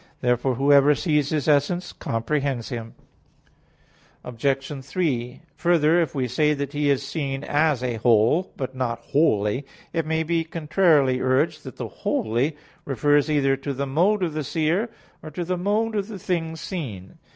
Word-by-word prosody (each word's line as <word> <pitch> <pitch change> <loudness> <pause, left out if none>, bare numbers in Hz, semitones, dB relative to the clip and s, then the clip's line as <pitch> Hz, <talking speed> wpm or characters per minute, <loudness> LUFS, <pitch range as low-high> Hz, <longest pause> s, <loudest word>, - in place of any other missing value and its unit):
Therefore 125 +1 +1
whoever 140 +2 +5
sees 150 -3 +1
His 155 -2 -1
essence, 150 +5 +1
comprehends 130 +1 -2
Him. 115 -3 -6 1.3
Obj. 135 +3 -2
3: 135 -5 -2
Further, 170 -1 +3
if 160 - -2
we 130 -2 0
say 150 +4 +2
that 140 0 -4
He 145 0 +1
is 140 -1 +2
seen 140 -2 -3
as 145 -4 +1
a 120 -2 -1
"whole," 115 - +3
but 130 -1 -4
not 125 -3 -1
"wholly," 115 -4 +1 0.3
it 165 -2 -1
may 160 0 0
be 165 +1 0
contrarily 155 -5 +2
urged 150 +5 +1
that 130 - -9
"wholly" 125 +8 -1 0.3
refers 145 +2 +2
either 140 -3 +2
to 140 0 -4
the 140 +2 -2
mode 180 +9 +2
of 165 -3 -1
the 155 0 -2
seer, 165 - 0 0.3
or 155 - -8
to 165 +4 -4
the 180 +2 -1
mode 210 +5 0
of 200 -1 -1
the 215 -3 -7
thing 170 -4 -2
seen. 130 - -7
145 Hz, 160 wpm, -24 LUFS, 130-160 Hz, 1.3 s, whoever